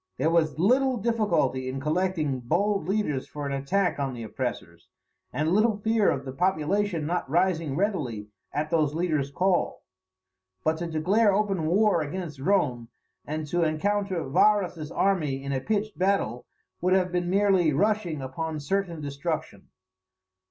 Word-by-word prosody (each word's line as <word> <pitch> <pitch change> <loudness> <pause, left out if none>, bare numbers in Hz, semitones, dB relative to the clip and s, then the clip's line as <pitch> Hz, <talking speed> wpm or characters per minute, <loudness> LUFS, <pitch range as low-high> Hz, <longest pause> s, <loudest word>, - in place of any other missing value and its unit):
There 160 - +1
was 160 -3 +2
little 255 +8 +3
difficulty 180 - 0
in 135 +1 -4
collecting 155 -2 0
bold 195 - 0
leaders 190 -10 -1
for 145 -1 -6
an 140 - -3
attack 145 +7 0
on 135 -2 -2
the 115 - -6
oppressors, 105 -8 -5 0.4
and 155 +2 0
little 215 +2 +3
fear 220 0 +2
of 135 0 -2
the 130 - -5
population 180 +3 0
not 175 -3 -2
rising 165 -3 +1
readily 145 - -2 0.2
at 150 +2 -2
those 155 -3 +1
leaders' 155 -5 0
call. 180 +5 0 0.8
But 160 0 +1
to 170 - -3
declare 190 +7 +2
open 195 -5 0
war 195 0 +3
against 155 -1 -5
Rome, 135 -9 +1 0.4
and 155 +1 -3
to 175 +2 +1
encounter 185 +2 0
Varus's 175 -1 +2
army 150 -9 0
in 140 - -4
a 130 - -1
pitched 215 +3 -2
battle, 185 - 0 0.3
would 185 +1 +2
have 185 -1 +1
been 175 -1 -1
merely 190 -4 +3
rushing 175 -3 0
upon 155 +4 -4
certain 170 +2 -2
destruction. 145 - -4
165 Hz, 150 wpm, -26 LUFS, 145-195 Hz, 0.8 s, little